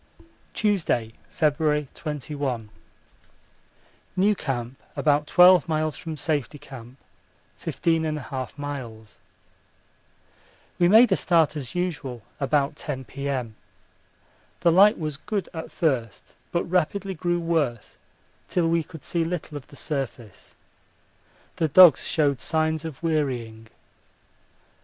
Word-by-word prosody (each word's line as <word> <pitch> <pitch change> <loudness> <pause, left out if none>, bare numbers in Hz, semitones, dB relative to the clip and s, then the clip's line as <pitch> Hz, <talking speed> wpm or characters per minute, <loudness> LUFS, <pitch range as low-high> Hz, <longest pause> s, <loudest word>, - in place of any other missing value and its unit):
Tuesday, 165 - 0 0.2
February 150 -1 +1
21. 140 -6 -4 1.5
New 205 +3 +3
Camp 130 -6 -4
about 150 0 +2
12 180 -2 +6
miles 155 -1 0
from 160 -3 -7
Safety 150 -2 -1
Camp. 130 -3 -12 0.6
15 165 -1 0
1/2 140 -5 -4
miles. 120 -7 -7 1.6
We 175 - +5
made 225 +6 +7
a - - +5
start 165 -4 +2
as 135 -2 -6
usual 150 - -3 0.2
about 145 +1 +1
10 130 -4 -5
P.M. 130 -3 -4 1.1
The 170 - +4
light 200 +5 +6
was 155 -3 -4
good 200 +4 -3
at 160 -1 -6
first, 120 - -2 0.2
but 170 - 0
rapidly 185 +3 -1
grew 175 0 -1
worse 155 -9 -1 0.5
till 175 -2 +1
we 165 0 +2
could 160 -2 -11
see 170 -1 -1
little 165 -2 -4
of 145 - -8
the - - -15
surface. 130 - -6 1.0
The 160 - +1
dogs 170 0 +7
showed 140 -5 +1
signs 160 -1 0
of 160 -1 -8
wearying. 125 -9 -2
150 Hz, 115 wpm, -25 LUFS, 130-165 Hz, 1.6 s, made